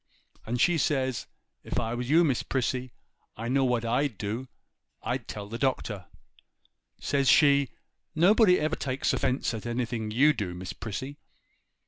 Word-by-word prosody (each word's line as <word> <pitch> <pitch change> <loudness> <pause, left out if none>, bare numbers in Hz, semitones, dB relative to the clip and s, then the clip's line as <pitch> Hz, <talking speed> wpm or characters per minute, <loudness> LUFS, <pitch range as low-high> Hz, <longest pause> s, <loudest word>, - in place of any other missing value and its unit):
And 120 +2 -2
says 170 +2 +3 0.4
she, - - -9 0.4
"If - - -2
I 115 +1 -2
was 120 +1 -4
you, 165 +3 +6
Miss 135 -7 +1
Prissy, 130 -1 -2 0.5
I 115 +2 -4
know 135 +2 +2
what 120 -2 +1
I'd 125 0 0
do; 110 +6 -4 0.6
I'd - - -3
tell 100 -1 -6
the 115 +3 -6
Doctor." 110 -8 -1 0.9
Says 140 -2 +1
she, 140 -3 +5 0.5
"Nobody 180 +3 +5
ever 155 +1 0
takes 130 -1 -1
offence 130 -2 0
at 110 +1 -5
anything 120 -2 -2
you 140 +8 +4
do, 100 -8 -4
Miss 90 +1 -6
Prissy." 130 +7 -6
125 Hz, 150 wpm, -28 LUFS, 115-140 Hz, 0.9 s, you